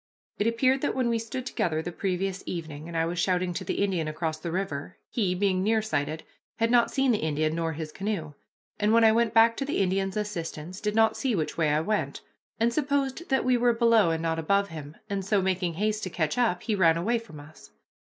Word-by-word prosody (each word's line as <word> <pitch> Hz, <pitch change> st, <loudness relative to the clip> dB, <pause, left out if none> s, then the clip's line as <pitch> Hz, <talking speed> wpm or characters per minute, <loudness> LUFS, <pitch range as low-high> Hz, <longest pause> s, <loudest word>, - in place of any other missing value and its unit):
It 205 Hz, -, +2 dB
appeared 255 Hz, +3 st, +2 dB
that -, -, -1 dB
when 255 Hz, -2 st, +1 dB
we 230 Hz, -1 st, +1 dB
stood 245 Hz, +3 st, -5 dB
together 160 Hz, -10 st, -1 dB
the 175 Hz, -, -4 dB
previous 190 Hz, +1 st, -2 dB
evening, 160 Hz, -3 st, -5 dB
and 170 Hz, -1 st, -4 dB
I 165 Hz, -, +2 dB
was 170 Hz, +1 st, -3 dB
shouting 180 Hz, 0 st, +1 dB
to -, -, -4 dB
the -, -, -1 dB
Indian 180 Hz, -6 st, 0 dB
across 155 Hz, 0 st, -3 dB
the 170 Hz, +1 st, -4 dB
river, 175 Hz, -3 st, -4 dB
he, 195 Hz, -7 st, 0 dB
being 185 Hz, -1 st, +1 dB
nearsighted, 160 Hz, -8 st, 0 dB, 0.3 s
had 230 Hz, +1 st, +1 dB
not 240 Hz, -1 st, +4 dB
seen 270 Hz, -1 st, +2 dB
the 215 Hz, -, +1 dB
Indian 155 Hz, 0 st, 0 dB
nor 165 Hz, 0 st, -1 dB
his 155 Hz, 0 st, -6 dB
canoe, 195 Hz, -7 st, -3 dB, 0.5 s
and 210 Hz, +1 st, +2 dB
when 230 Hz, 0 st, +5 dB
I 220 Hz, -, +7 dB
went 230 Hz, 0 st, +2 dB
back 230 Hz, +1 st, +6 dB
to -, -, -1 dB
the 285 Hz, -, -2 dB
Indian's 195 Hz, +1 st, 0 dB
assistance, 180 Hz, -4 st, -5 dB
did 210 Hz, 0 st, -1 dB
not 220 Hz, 0 st, +4 dB
see 260 Hz, -5 st, 0 dB
which 155 Hz, -4 st, -2 dB
way 160 Hz, -2 st, +1 dB
I 150 Hz, +1 st, +2 dB
went, 210 Hz, +5 st, -2 dB, 0.4 s
and 235 Hz, +1 st, +2 dB
supposed 280 Hz, +2 st, -1 dB
that 265 Hz, -2 st, +2 dB
we 255 Hz, -1 st, +4 dB
were 240 Hz, 0 st, +3 dB
below 230 Hz, -5 st, +4 dB
and 165 Hz, 0 st, -1 dB
not 165 Hz, 0 st, 0 dB
above 200 Hz, +5 st, +1 dB
him, 155 Hz, -2 st, -9 dB
and 200 Hz, -2 st, -2 dB
so, 205 Hz, +1 st, +2 dB
making 185 Hz, -2 st, -1 dB
haste 215 Hz, +3 st, 0 dB
to 185 Hz, -, -3 dB
catch 160 Hz, -3 st, -1 dB
up, 235 Hz, -8 st, +1 dB
he 225 Hz, -, -1 dB
ran 165 Hz, -5 st, +4 dB
away 230 Hz, +8 st, +1 dB
from 200 Hz, -10 st, -12 dB
us. 150 Hz, +2 st, -14 dB
195 Hz, 230 wpm, -27 LUFS, 165-225 Hz, 0.5 s, I